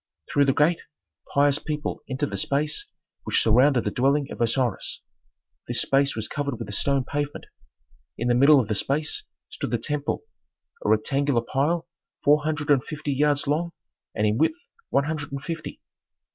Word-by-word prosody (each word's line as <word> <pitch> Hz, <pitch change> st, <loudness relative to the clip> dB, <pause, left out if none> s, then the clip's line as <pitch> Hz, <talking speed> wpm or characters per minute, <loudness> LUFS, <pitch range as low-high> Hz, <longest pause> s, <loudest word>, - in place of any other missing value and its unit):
Through 145 Hz, -, +4 dB
the 135 Hz, -, +3 dB
gate 165 Hz, +3 st, +3 dB, 0.5 s
pious 145 Hz, 0 st, +3 dB
people 150 Hz, -1 st, -4 dB
entered 135 Hz, +2 st, -2 dB
the -, -, -3 dB
space 150 Hz, -, -1 dB, 0.4 s
which -, -, +1 dB
surrounded 125 Hz, +3 st, +4 dB
the -, -, -1 dB
dwelling 140 Hz, +2 st, +1 dB
of -, -, -6 dB
Osiris; 120 Hz, -1 st, 0 dB, 0.6 s
this 120 Hz, 0 st, 0 dB
space 135 Hz, 0 st, +2 dB
was 110 Hz, -1 st, -3 dB
covered 140 Hz, -4 st, -3 dB
with 115 Hz, -, -6 dB
a -, -, -5 dB
stone 135 Hz, +6 st, +1 dB
pavement. 145 Hz, +2 st, -3 dB, 0.7 s
In 120 Hz, -, -2 dB
the 120 Hz, -, +4 dB
middle 140 Hz, +4 st, +6 dB
of 120 Hz, -, 0 dB
the 105 Hz, -, 0 dB
space 145 Hz, +8 st, -1 dB, 0.3 s
stood -, -, -5 dB
the 120 Hz, -, +1 dB
temple, 145 Hz, +4 st, -2 dB, 0.6 s
a -, -, 0 dB
rectangular 135 Hz, +4 st, +2 dB
pile 150 Hz, +8 st, 0 dB, 0.4 s
four 150 Hz, +1 st, +5 dB
hundred 150 Hz, -1 st, -1 dB
and 135 Hz, -3 st, +4 dB
fifty 150 Hz, -1 st, -4 dB
yards 145 Hz, +1 st, +2 dB
long 165 Hz, +4 st, 0 dB, 0.4 s
and 105 Hz, -, +1 dB
in 105 Hz, +2 st, +1 dB
width 240 Hz, -, +2 dB, 0.3 s
one 140 Hz, -, +2 dB
hundred 150 Hz, -1 st, -4 dB
and 140 Hz, -1 st, -5 dB
fifty. 165 Hz, -2 st, -5 dB
140 Hz, 175 wpm, -25 LUFS, 125-150 Hz, 0.7 s, middle